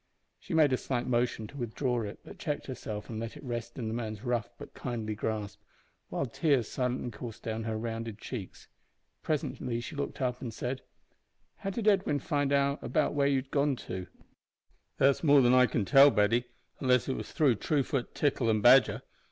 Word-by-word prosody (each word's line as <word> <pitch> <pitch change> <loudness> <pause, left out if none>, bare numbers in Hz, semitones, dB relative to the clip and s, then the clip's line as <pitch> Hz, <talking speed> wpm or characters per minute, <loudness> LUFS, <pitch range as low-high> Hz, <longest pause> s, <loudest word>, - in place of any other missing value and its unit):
She 170 - -5
made 150 -4 +5
a - - +3
slight 125 -2 -2
motion 120 -2 0
to 140 - -11
withdraw 120 0 -1
it, 105 -2 -6
but 200 - -12
checked 150 -5 -3
herself 110 -5 -6
and 110 -2 -5
let 115 0 -5
it - - -12
rest 120 -2 -5
in 120 -4 -3
the 110 - -2
man's 110 -3 -4
rough 120 -2 -1
but - - -11
kindly 115 -4 -4
grasp, 105 -1 -4 0.5
while 140 - -1
tears 135 -2 +1
silently 125 -1 -2
coursed 115 -3 -8
down 110 0 -3
her 110 -1 -2
rounded 115 -1 -4
cheeks. 110 -4 -7 0.5
Presently 130 -5 -2
she 135 +6 -7
looked 145 - -4
up 125 -2 -1
and 120 - -4
said 125 +4 -4 0.8
"How 195 - -4
did 215 +2 -3
Edwin 190 -8 +3
find 145 0 -1
out 140 0 +2 0.3
where 140 -1 +2
you 140 - +3
had 135 0 -3
gone 140 -1 +2
to?" 95 -6 -6 0.9
"That's 135 +3 +3
more 145 -3 +7
than 120 +1 +5
I 125 0 +6
can 110 -2 -1
tell, 135 +9 +8
Betty, 115 +1 +2 0.3
unless 125 -2 +3
it 135 - 0
was - - -6
through 140 -8 +3
Truefoot, 135 +1 -1
Tickle, 130 -5 +1
and 110 -1 +1
Badger. 130 +2 +6
125 Hz, 190 wpm, -30 LUFS, 115-140 Hz, 0.9 s, tell